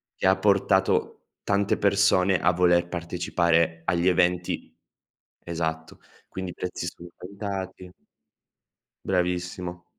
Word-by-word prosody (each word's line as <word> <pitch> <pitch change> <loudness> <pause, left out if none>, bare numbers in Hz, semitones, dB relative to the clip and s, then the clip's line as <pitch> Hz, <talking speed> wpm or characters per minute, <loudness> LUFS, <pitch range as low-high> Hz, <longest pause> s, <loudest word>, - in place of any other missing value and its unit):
Che - - 0
ha 95 - +4
portato 100 -1 +1 0.2
tante 100 0 +1
persone 100 -2 +3
a 90 - +3
voler 85 0 +3
partecipare 85 -1 0
agli 85 0 +1
eventi 90 -1 0 0.7
esatto. 80 -1 -4 0.3
Quindi, 95 -1 -5
i - - -11
prezzi 90 0 -4
sono 85 0 -9
aumentati 95 -1 -6 1.1
Bravissimo, 90 -1 -2
90 Hz, 100 wpm, -25 LUFS, 85-95 Hz, 1.1 s, ha